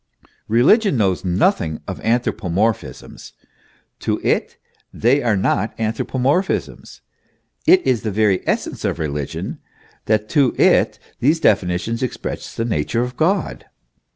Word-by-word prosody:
Eeligion 145 - +4
knows 95 -6 +1
nothing 90 - +1
of - - -5
anthropomorphisms; 110 -3 -2 0.7
to - - -1
it - - 0 0.3
they 130 +5 +2
are 115 -5 +1
not 95 +2 0
anthropo 115 +3 -2
morphisms. 150 +10 -1 0.7
It 365 +2 +6
is 120 -5 +1
the 110 - -2
very 105 -2 +2
essence - - -2
of - - -1
religion, 75 -3 -4 0.5
that 110 0 +1
to 140 -5 +2
it - - +3 0.2
these 155 +6 +2
definitions 95 - +1
express 130 - -5
the 115 - -2
nature 115 +3 -1
of 125 0 -5
God. 185 +7 0
115 Hz, 125 wpm, -20 LUFS, 95-130 Hz, 0.7 s, It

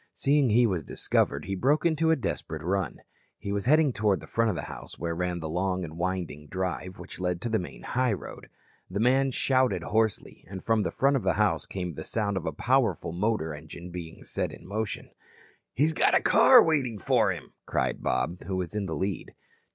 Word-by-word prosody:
Seeing 140 -2 +3
he 120 +3 +5
was 90 -8 0
discovered 70 +1 0
he 95 - -3
broke 140 - +2
into 160 -1 +2
a 160 - +5
desperate 80 - -4
run. 95 -2 -1 0.4
He 100 - -5
was 100 +1 -1
heading 150 -1 +4
toward 105 -3 +1
the - - -10
front 115 0 +1
of 100 - -1
the 75 - -4
house - - -9
where 85 +1 -2
ran 90 0 -2
the 80 - -4
long 90 +3 -1
and 80 -2 -7
winding 85 -4 -3
drive 95 +1 -3
which - - -10
led 90 -1 -1
to 120 - -2
the 110 -1 +1
main 90 - -8
highroad. 125 -5 -2 0.4
The 95 +3 -3
man 130 +4 +3
shouted 130 -8 +1
hoarsely, 110 +3 -1
and 95 -1 -7
from 115 -1 +2
the 100 - 0
front 140 +1 +2
of - - -2
the 95 -2 +1
house 105 -1 +1
came 90 -3 -4
the - - -7
sound 105 -3 -1
of 90 -3 -3
a - - 0
powerful 125 - +1
motor 95 -4 0
engine 80 +4 -9
being 85 -2 -8
set - - -3
in - - -12
motion. 105 +2 -4 0.6
"He's 155 +4 +3
got - - +3
a - - +6
car 250 -3 +7
waiting 135 -9 +1
for - - +2
him," - - -8
cried - - -1
Bob, 85 +2 -1
who 95 - -2
was 90 -1 -3
in 105 -2 -2
the 80 - -3
lead. 95 +3 -3
100 Hz, 210 wpm, -28 LUFS, 90-120 Hz, 0.6 s, car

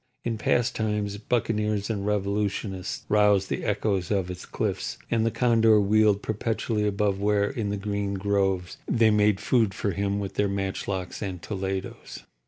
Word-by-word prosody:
In 115 -2 -2
past 120 +2 +1
times 105 -2 -1
buccaneers 105 -3 0
and 100 -3 -3
revolutionists 100 -2 -2
roused 105 -2 +3
the - - -2
echoes 95 -4 0
of 95 -3 0
its 90 0 -8
cliffs, - - -2
and 115 -1 +2
the - - +4
condor 115 -2 +4
wheeled 105 0 +3
perpetually 110 0 -1
above 100 -1 0
where, 100 0 +2
in 115 -5 -3
the 100 - -2
green 100 0 -2
groves, 95 -2 0
they 115 -2 +4
made 105 -1 +3
food 110 -6 +2
for 100 - -1
him 100 +2 -1
with 100 -1 -4
their 105 0 +1
matchlocks 95 -1 -3
and 95 -4 -4
toledos. 95 -2 -5
100 Hz, 160 wpm, -26 LUFS, 100-110 Hz, -, the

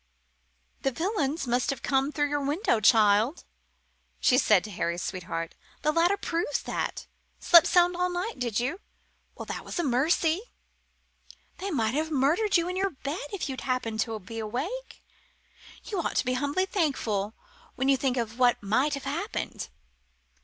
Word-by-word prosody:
"The 270 - +1
villains 315 - -1
must 245 +1 0
have 275 -4 -3
come 270 +1 +1
through 290 -1 0
your 290 -1 -1
room, 285 +3 0 0.2
child," 215 - +4 0.8
she 255 - +4
said 210 -7 +4
to 210 - -8
Harry's 170 -1 -2
sweetheart; 165 -3 -4 0.3
"the 305 - +3
ladder 340 +5 +3
proves 335 -6 -2
that. - - -3 0.3
Slept 340 -2 +7
sound 355 0 +4
all 360 +1 +1
night, 360 - -3
did 235 -3 -1
you? 270 +10 -2 0.6
Well, - - -7
that - - -5
was - - -6
a 345 - +1
mercy! 315 +6 +2 1.2
They 390 - -3
might 230 - 0
have 310 +3 0
murdered 320 +9 +2
you 340 0 0
in 365 - -3
your 390 +1 +1
bed 290 -1 -5
if 390 -6 -3
you'd 265 -2 -5
happened 240 -4 -2
to 225 0 -1
be 225 +4 -8
awake. 275 - -5 0.8
You 400 - -3
ought - - -2
to - - +1
be 255 - +1
humbly 285 +8 0
thankful 230 - -1 0.4
when 260 +1 -1
you 275 - +5
think 265 -1 0
of 230 0 -3
what 245 -4 +3
might 255 +9 +2
have 280 - -7
happened." - - -4
275 Hz, 165 wpm, -27 LUFS, 235-340 Hz, 1.2 s, Slept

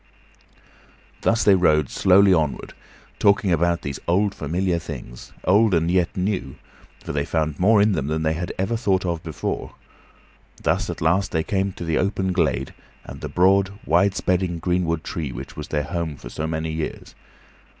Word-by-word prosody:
Thus 115 0 +2
they 100 - +6
rode 75 -6 +3
slowly 95 +1 +5
onward, 80 -5 -1 0.5
talking 100 -1 +3
about 85 +1 +1
these 70 -1 -4
old, 100 +4 +2
familiar 85 +2 -1
things; 65 -7 -9
old 100 +1 +4
and 85 +1 +1
yet 90 +1 +1
new, 90 -8 -2 0.5
for - - -5
they 70 -1 0
found 80 -1 -2
more 105 +4 +5
in 105 +1 +4
them 70 -7 -1
than 80 +1 -1
they 80 0 +1
had 85 +2 -4
ever 95 +5 -1
thought 100 -5 0
of 85 -2 -2
before. 80 -3 -5 0.9
Thus - - 0
at - - -5
last 90 +5 +1
they 80 -1 0
came 95 +1 -1
to 85 - -7
the 80 -1 0
open 95 -1 0
glade, 65 -7 0 0.3
and - - -10
the - - -5
broad, 95 +2 +3
wide 95 +4 +3
spreading 90 -2 0
greenwood 85 -1 -1
tree 75 -6 -4
which 65 +3 -8
was 75 -1 -6
their 75 -1 -1
home 80 +1 -3
for - - -10
so 80 +5 -4
many 80 0 -3
years. 80 0 -5
85 Hz, 175 wpm, -23 LUFS, 80-95 Hz, 0.9 s, they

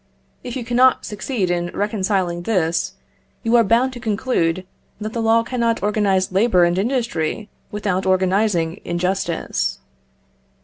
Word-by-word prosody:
If 245 - -6
you 250 -3 -4
cannot 250 +2 +3
succeed 210 -3 -2
in 175 0 -1
reconciling 195 -4 -1
this, 175 -4 0 0.5
you 230 0 +2
are 235 - +6
bound 235 +5 +2
to 245 - -8
conclude 200 -6 0 0.3
that 215 +1 -5
the 230 - -2
law 225 0 +3
cannot 230 -2 -1
organise 200 -3 +1
labour 190 -2 +4
and 175 +1 +2
industry 220 - -1 0.2
without 200 -3 -1
organising 185 -2 +1
injustice. 175 - -1
205 Hz, 130 wpm, -20 LUFS, 180-230 Hz, 0.5 s, are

